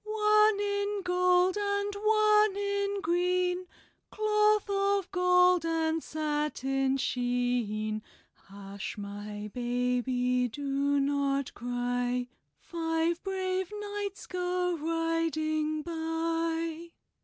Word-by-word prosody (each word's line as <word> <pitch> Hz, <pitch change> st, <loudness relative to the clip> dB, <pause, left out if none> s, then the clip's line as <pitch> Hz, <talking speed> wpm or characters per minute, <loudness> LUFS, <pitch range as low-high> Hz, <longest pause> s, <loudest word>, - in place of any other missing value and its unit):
One 425 Hz, 0 st, +3 dB
in 405 Hz, 0 st, -1 dB
gold 360 Hz, +1 st, +3 dB
and 405 Hz, 0 st, -1 dB
one 425 Hz, 0 st, +3 dB
in 400 Hz, 0 st, -1 dB
green, 360 Hz, +1 st, 0 dB, 0.4 s
Cloth 425 Hz, -1 st, +2 dB
of 395 Hz, -1 st, 0 dB
gold 360 Hz, -1 st, +4 dB
and 325 Hz, -1 st, 0 dB
satin 295 Hz, -3 st, -1 dB
sheen. 245 Hz, -4 st, -1 dB, 0.3 s
Hush, 200 Hz, +2 st, -8 dB
my 205 Hz, +1 st, -7 dB
baby, 250 Hz, 0 st, 0 dB
do 280 Hz, +3 st, 0 dB
not 280 Hz, -1 st, 0 dB
cry, 245 Hz, 0 st, -2 dB, 0.3 s
Five 330 Hz, 0 st, -1 dB
brave 375 Hz, -1 st, -2 dB
knights 410 Hz, -1 st, -5 dB
go 360 Hz, 0 st, -1 dB
riding 315 Hz, -1 st, -1 dB
by." 330 Hz, 0 st, -2 dB
330 Hz, 85 wpm, -29 LUFS, 265-390 Hz, 0.4 s, gold